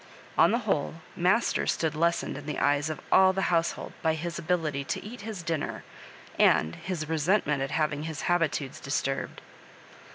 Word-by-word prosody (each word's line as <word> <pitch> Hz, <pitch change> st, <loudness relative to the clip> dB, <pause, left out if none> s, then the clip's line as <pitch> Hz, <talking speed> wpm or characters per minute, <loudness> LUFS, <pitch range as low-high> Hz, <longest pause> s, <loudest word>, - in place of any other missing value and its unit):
On -, -, +6 dB
the 230 Hz, -, +2 dB
whole, 160 Hz, -6 st, 0 dB, 0.2 s
master 185 Hz, +7 st, +2 dB
stood 160 Hz, -2 st, 0 dB
lessened 170 Hz, +2 st, 0 dB
in 145 Hz, +1 st, -8 dB
the 150 Hz, -, -3 dB
eyes 145 Hz, +2 st, +2 dB
of 155 Hz, -, -4 dB
all 190 Hz, 0 st, +6 dB
the 190 Hz, -2 st, 0 dB
household 165 Hz, 0 st, 0 dB
by 160 Hz, -1 st, +2 dB
his 170 Hz, +1 st, -4 dB
ability 155 Hz, -5 st, -1 dB
to -, -, -4 dB
eat 230 Hz, +1 st, -8 dB
his 205 Hz, -4 st, -6 dB
dinner, 165 Hz, -3 st, -3 dB, 0.6 s
and 80 Hz, +2 st, +4 dB
his 170 Hz, -5 st, -4 dB
resentment 160 Hz, -2 st, +1 dB
at 135 Hz, -, -1 dB
having 155 Hz, -1 st, -1 dB
his 160 Hz, -1 st, -5 dB
habitudes 160 Hz, -6 st, 0 dB
disturbed. 135 Hz, 0 st, -2 dB
160 Hz, 165 wpm, -28 LUFS, 145-175 Hz, 0.6 s, On